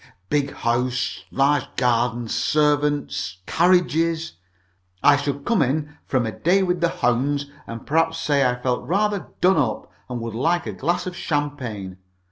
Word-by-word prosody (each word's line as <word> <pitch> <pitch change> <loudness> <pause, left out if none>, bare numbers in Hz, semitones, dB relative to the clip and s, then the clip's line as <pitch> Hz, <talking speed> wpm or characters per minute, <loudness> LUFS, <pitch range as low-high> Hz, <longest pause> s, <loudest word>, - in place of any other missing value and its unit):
Big 145 -1 +1
house, 120 +1 -1
large 140 0 +2
garden, 120 -1 +1
servants, 145 -8 0
carriages. 165 -2 +2 0.7
I 145 - +7
should 140 0 -3
come 230 -4 +2
in 150 +3 -1
from 130 -3 +1
a 110 - -2
day 185 - +2
with 180 -1 0
the 170 - +3
hounds, 140 +4 0 0.2
and 115 0 -7
perhaps 165 +2 +1
say 145 -3 +2
I 125 0 -2
felt 125 0 -1
rather 205 +2 0
done 185 0 +5
up, 125 -8 -1 0.2
and 125 -1 -3
would 115 -1 -5
like 165 +9 +1
a 110 - -4
glass 170 - -1
of 180 -1 -5
champagne. 125 - -3
145 Hz, 150 wpm, -23 LUFS, 125-165 Hz, 0.7 s, I